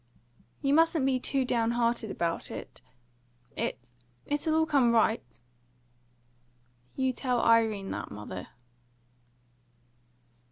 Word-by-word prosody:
"You 275 0 +2
mustn't 325 -2 +4
be 265 -1 +2
too 265 +1 0
down 235 -2 +1
hearted 235 -2 0
about 170 -3 -2
it. - - -8 0.7
It 120 0 -4 0.3
it'll 295 +2 0
all 320 0 +3
come 275 -6 +3
right 225 -1 +3 0.9
" 120 0 -38
"You 260 -1 0
tell 250 -1 -1
Irene 225 -4 +3
that, - - -5
mother." 100 -3 -7
230 Hz, 110 wpm, -29 LUFS, -, 0.9 s, mustn't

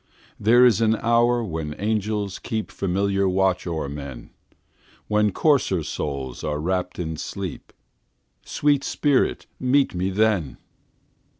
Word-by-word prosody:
There 120 +4 +6
is 115 -3 +4
an 110 0 +3
hour 120 +1 +2
when 80 -6 -4
angels 105 -1 -2
keepFamiliar 100 -3 -1
watch 95 -1 +1
o'er 80 -4 -2
men, 70 -3 -8 0.8
When 105 0 +2
coarser 120 - +2
souls 70 -4 -4
are 75 -1 -1
wrapp'd 90 +2 -2
in 80 -3 -4
sleep—Sweet 135 - -4
spirit, 145 -3 +1
meet 135 +2 +2
me 90 +1 -1
then! 95 - +1
100 Hz, 110 wpm, -23 LUFS, 85-115 Hz, 0.8 s, There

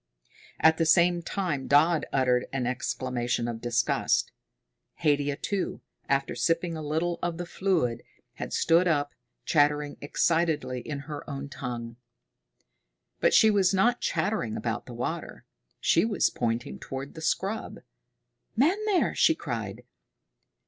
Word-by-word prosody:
At 160 0 +5
the 165 - +3
same 175 +1 +4
time 170 -7 -2
Dodd 155 +3 +4
uttered 125 -2 +2
an 135 -2 -2
exclamation 125 -1 -2
of 115 -1 -5
disgust. 120 0 +1 0.7
Haidia, 145 -2 +2
too, 195 +5 -3 0.3
after 140 0 +1
sipping 165 0 0
a 160 - -5
little 160 +3 -1
of 170 -1 -2
the 175 - -4
fluid, 170 -11 0 0.3
had - - -6
stood 170 +2 +3
up, 145 -3 +1 0.3
chattering 145 0 +2
excitedly 150 -4 0
in 140 +2 -5
her 145 0 -7
own 140 0 -6
language. 120 -2 -5 1.2
But - - +3
she 220 - +7
was 195 -2 +3
not 240 +6 +2
chattering - - -1
about - - -3
the - - -8
water. - - -5 0.3
She - - +3
was 215 -3 +1
pointing 120 +3 -2
toward 135 +1 -6
the 160 - -9
scrub. 195 +6 -2 0.8
"Men 340 - +2
there!" 395 -4 +2
she - - +4
cried. - - -5
150 Hz, 135 wpm, -27 LUFS, 130-175 Hz, 1.2 s, she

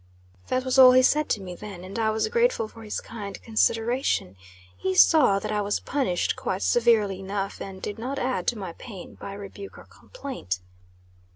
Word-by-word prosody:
That 255 0 -1
was 260 +1 +2
all 255 -1 +10
he 255 0 +6
said 300 +3 +3
to 210 - 0
me 180 -2 -7
then, 190 -1 -9
and 195 +5 -6
I 220 -1 +2
was 220 0 0
grateful 470 - +1
for 225 +1 -14
his 215 -1 -4
kind 205 -3 -8
consideration. 225 - +1 0.4
He 190 - -2
saw 260 - +6
that 215 +2 -4
I 210 -1 0
was 205 0 -1
punished 200 -11 -1
quite 190 +1 -3
severely 220 -5 +3
enough, 195 0 -4
and 190 -1 -7
did 205 +2 -5
not 260 +4 -4
add 255 0 -1
to 240 - +1
my 190 -5 -6
pain 200 -4 -10
by 200 - -8
rebuke 200 0 -9
or - - -12
complaint. 265 - -6
215 Hz, 190 wpm, -26 LUFS, 195-255 Hz, 0.4 s, all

